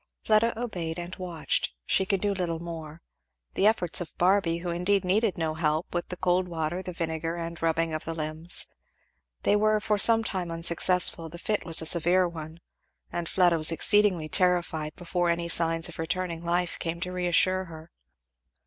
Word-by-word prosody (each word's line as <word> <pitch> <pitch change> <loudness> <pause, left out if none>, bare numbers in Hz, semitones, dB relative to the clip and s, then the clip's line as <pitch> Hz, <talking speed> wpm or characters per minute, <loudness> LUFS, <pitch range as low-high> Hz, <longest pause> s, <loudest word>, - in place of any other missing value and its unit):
Fleda 220 +1 +2
obeyed; 175 -9 -4
and 175 +1 -6
watched, 175 -4 -2
she 190 - +1
could 195 -2 0
do 205 -1 0
little 175 -4 -2
more, 165 -1 -8 0.5
the 200 - +3
efforts 180 -6 +2
of 175 - -8
Barby, 180 -2 +2
who 175 0 -4
indeed 185 +3 0
needed 205 +2 +1
no 160 -2 -1
help, 155 +1 -1
with 175 0 -2
the 180 - -7
cold 180 0 +1
water, 165 +1 -3
the 185 - -6
vinegar, 165 -1 -3
and 170 -1 -6
rubbing 165 0 0
of 155 - -3
the 165 - -4
limbs. 155 +2 0 0.8
They 205 - +3
were 215 +1 +2
for 210 -1 0
sometime 205 -5 +1
unsuccessful; 170 0 +2
the 170 - -9
fit 210 +4 -2
was 165 -1 +5
a - - -6
severe 175 +3 +3
one; 160 0 -9 0.5
and 175 -1 -3
Fleda 175 -3 +3
was 155 +1 +5
exceedingly 185 0 +2
terrified 170 -4 0
before 175 0 -1
any 170 0 -1
signs 165 -1 +2
of - - -11
returning 170 0 -3
life 175 +1 -1
came 170 0 -3
to 180 0 -3
reassure 180 +1 +2
her. 160 -1 -12
175 Hz, 175 wpm, -27 LUFS, 165-185 Hz, 0.8 s, was